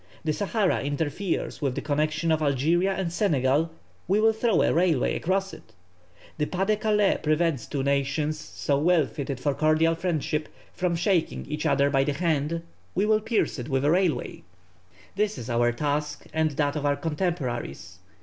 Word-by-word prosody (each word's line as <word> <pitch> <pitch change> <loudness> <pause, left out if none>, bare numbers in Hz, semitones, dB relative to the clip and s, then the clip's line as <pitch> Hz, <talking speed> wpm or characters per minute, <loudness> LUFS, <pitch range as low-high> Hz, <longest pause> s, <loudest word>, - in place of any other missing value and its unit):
The 155 -1 0
Sahara 205 +1 0
interferes 145 +7 -2
with 135 -3 0
the - - -2
connexion 155 +2 0
of 160 -1 +2
Algeria 155 +7 +2
and 185 -3 -3
Senegal; 155 - +2 0.4
we 195 +4 +3
will 220 +1 +4
throw 220 -3 +2
a - - +2
railway 165 -5 +2
across 195 +2 -1
it. - - -14 0.7
The 150 - +1
Pas 190 +1 -1
de 215 +1 +2
Calais 210 -1 +2
prevents 155 -4 +1
two 140 -3 -2
nations 140 +2 0
so 140 -2 -2
well 165 0 +3
fitted 140 -2 -5
for 145 +2 0
cordial 155 +2 +3
friendship 160 -3 -2 0.2
from 180 -2 0
shaking 175 0 0
each 150 +1 -2
other 140 0 +3
by 135 -1 +3
the 145 - -1
hand; 160 +1 -1 0.3
we 195 +4 +2
will 215 0 +3
pierce 225 - 0
it 125 - -6
with 135 0 0
a 150 - +4
railway! 175 -6 0 0.7
This 210 +1 0
is 120 +1 -6
our 120 0 +3
task 145 +3 -2
and 160 0 +2
that 145 0 -1
of 150 - -2
our 145 0 +2
contemporaries. 130 - -3
155 Hz, 175 wpm, -26 LUFS, 140-180 Hz, 0.7 s, will